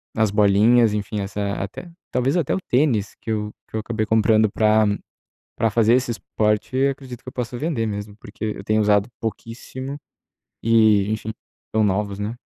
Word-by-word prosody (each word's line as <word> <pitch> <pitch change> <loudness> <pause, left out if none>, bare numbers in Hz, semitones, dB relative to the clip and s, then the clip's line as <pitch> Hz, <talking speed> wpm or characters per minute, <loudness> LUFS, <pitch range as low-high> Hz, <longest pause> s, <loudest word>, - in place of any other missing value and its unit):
as 110 -2 +2
bolinhas, 105 +3 +4
enfim, 105 0 -3
essa 100 0 -3
até 100 - -6 0.2
talvez, 135 +7 +1
até 160 - 0
o - - -1
tênis 125 - +1
que - - -8
eu 105 -1 -2 0.2
que - - -8
eu - - 0
acabei 110 0 -2
comprando 110 0 +3
pra 110 0 +3 0.7
pra 115 - +2
fazer 115 +1 +3
esse 125 0 +2
esporte, 105 +1 -1
acredito 130 -3 -6
que 130 - -7
eu - - -15
possa 125 0 -4
vender 140 -5 -1
mesmo, 105 0 -5
porque 110 -2 -10
eu 105 -2 -3
tenho 110 +2 +2
usado 105 0 +3
pouquíssimo, 130 +5 -6 0.7
e, 110 -3 +4
enfim, 110 0 -3 0.4
tão 110 - +2
novos, 100 0 0
né. 105 +3 -3
110 Hz, 175 wpm, -22 LUFS, 105-120 Hz, 0.7 s, bolinhas